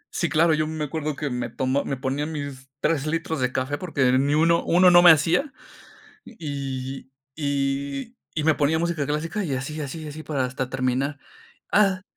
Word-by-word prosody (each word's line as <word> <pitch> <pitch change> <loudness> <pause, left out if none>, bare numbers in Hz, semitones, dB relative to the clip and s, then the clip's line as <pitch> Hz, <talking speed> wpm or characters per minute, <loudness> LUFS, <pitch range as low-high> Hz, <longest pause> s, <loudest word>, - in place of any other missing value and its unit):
Sí, 170 - 0
claro, 160 +1 +4
yo 155 0 +1
me 155 -1 -3
acuerdo 150 0 -3
que 145 -3 -3
me 125 0 -3
tomó 130 +2 0
me 135 - -2
ponían 140 +4 -2
mis 140 -3 -6
3 155 -3 +1
litros 160 -1 -2
de 125 0 0
café, 130 +3 -2
porque 140 -8 +1
ni 140 +3 +2
uno 165 +2 +3
uno 180 +2 +5
no 175 0 +8
me 175 - +9
hacía, 165 - +4 0.7
y 135 - -6 0.2
y - - -66
y 140 0 -1 0.3
y 155 - 0
y - - -3
me 160 0 +4
ponía 150 +2 +1
música 170 -4 -1
clásica 160 +7 -2
y 140 -6 -2
así 150 +4 -4
así 155 +3 -6
así, 150 +1 -7
para 140 -5 -1
hasta 125 0 -4
terminar, 135 +2 -1 0.5
¡ah! 195 -3 +3
145 Hz, 190 wpm, -24 LUFS, 135-160 Hz, 0.7 s, me